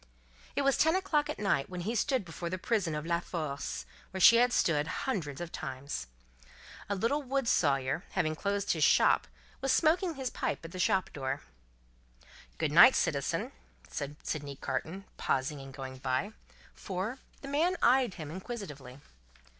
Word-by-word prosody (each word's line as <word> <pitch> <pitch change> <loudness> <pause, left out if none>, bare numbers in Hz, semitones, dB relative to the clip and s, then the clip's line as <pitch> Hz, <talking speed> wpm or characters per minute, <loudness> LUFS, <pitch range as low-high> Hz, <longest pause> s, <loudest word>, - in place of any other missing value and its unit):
It - - +1
was 275 -1 +3
ten 320 +2 +4
o'clock 305 -6 +1
at - - -3
night 195 -9 0
when 180 -1 -5
he 215 +6 -2
stood 240 -1 +1
before 170 +1 -5
the 185 - -2
prison 185 -5 0
of 150 +1 -4
La 170 0 +1
Force, 155 -5 -4 0.2
where 190 - -5
she 230 +5 +9
had 245 +1 +4
stood 150 -9 +2
hundreds 165 - -3
of 175 -1 -5
times. 135 - -5 0.8
A 200 - 0
little 230 +10 +1
wood 270 -2 -1
sawyer, 140 0 +2
having 155 0 +1
closed 200 +3 -1
his - - +1
shop, - - +5 0.3
was 270 0 +1
smoking 330 +4 +3
his 265 -2 -3
pipe - - -3
at 165 - -9
his 185 - -2
shop 190 +1 +1
door. 135 -2 -3 1.2
"Good - - 0
night, - - +9
citizen," - - 0 0.4
said 140 +1 -4
Sydney 145 -2 -4
Carton, 190 +7 -4
pausing 135 +2 -1
in 135 0 -9
going 130 -1 -8
by; 130 +10 -1 0.4
for, 200 +7 -4 0.2
the 275 - -8
man 325 +6 +1
eyed 250 -3 +4
him 155 -4 -7
inquisitively. 150 - -7
185 Hz, 165 wpm, -31 LUFS, 145-245 Hz, 1.2 s, she